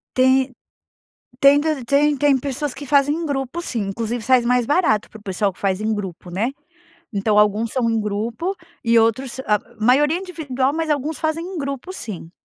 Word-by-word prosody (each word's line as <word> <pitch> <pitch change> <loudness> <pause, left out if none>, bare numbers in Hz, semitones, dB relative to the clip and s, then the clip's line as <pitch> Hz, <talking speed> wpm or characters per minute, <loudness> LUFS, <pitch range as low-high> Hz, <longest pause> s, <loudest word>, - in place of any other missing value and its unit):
Tem 260 +1 +3 0.9
tem 280 +1 +6
tam 305 -4 -1
tem 285 +3 +3
tem 285 -1 +4
pessoas 280 +1 -3
que 285 - -8
fazem 285 +1 +3
em 335 +1 -3
grupo, 280 +2 -3
sim. 250 -9 -3
Inclusive, 230 +4 -3
sais 250 +1 +3
mais 245 0 +2
barato 285 - +2
para 220 - -12
o - - -22
pessoal 195 0 -1
que - - -22
faz 195 -1 0
em 220 +1 0
grupo, 190 -4 -6
né. 205 +8 -1 0.6
Então 205 +1 +1
alguns 210 +2 +2
são 250 -3 +1
em 225 - +1
grupo, 225 - -2 0.3
e 230 0 +5
outros 235 +4 +1
a 210 -5 +1 0.2
maioria 290 +7 +4
é - - -7
individual, 285 -8 -2
mas 320 0 -2
alguns 295 +1 -1
fazem 315 +1 -1
em 370 0 -6
grupo, 275 +4 -4
sim. 200 - -7
260 Hz, 195 wpm, -21 LUFS, 220-290 Hz, 0.9 s, tem